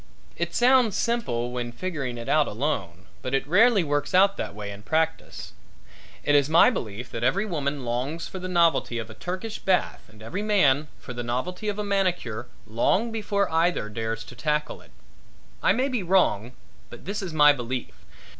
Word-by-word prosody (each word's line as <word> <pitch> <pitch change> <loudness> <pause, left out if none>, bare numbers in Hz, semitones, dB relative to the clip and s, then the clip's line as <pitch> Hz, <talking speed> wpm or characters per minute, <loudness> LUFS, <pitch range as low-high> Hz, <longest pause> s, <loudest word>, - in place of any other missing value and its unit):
It - - -3
sounds 245 -4 +4
simple 125 - -1
when 125 -1 -3
you - - -8
figuring 140 -6 -4
it 115 - -7
out 150 -1 +3
alone, 100 - -3 0.2
but 130 +1 -2
it 135 - 0
rarely 205 +4 +5
works 145 +3 -1
out 195 +2 +5
that - - -4
way 105 -1 -6
in 100 0 -9
practice. 160 +7 -2 0.7
It 145 - +2
is 145 0 +4
my 165 +9 +6
belief 115 - -5
that 115 - -4
every 195 - +2
woman 145 -7 -3
longs 130 +8 -3
for 190 - -7
the 185 - -5
novelty 170 -9 +2
of 115 -1 -5
a - - -10
Turkish 185 - -5
bath 185 -1 0
and 110 0 -15
every 150 - -4
man 155 -9 +3
for 125 - -9
the 120 - -4
novelty 130 - -3
of 205 - -3
a 210 - -2
manicure 180 - -1 0.2
long 150 - +1
before 205 -2 0
either 165 -8 +1
dares 115 +1 -3
to 125 - -12
tackle 150 +5 -2
it. - - -19 0.7
I - - +4
may 255 +7 +1
be 250 -5 -1
wrong 170 - +2 0.4
but 120 - -12
this 200 +3 -3
is 190 -3 -5
my 150 -2 +6
belief. 125 -1 -4
150 Hz, 190 wpm, -25 LUFS, 120-190 Hz, 0.7 s, my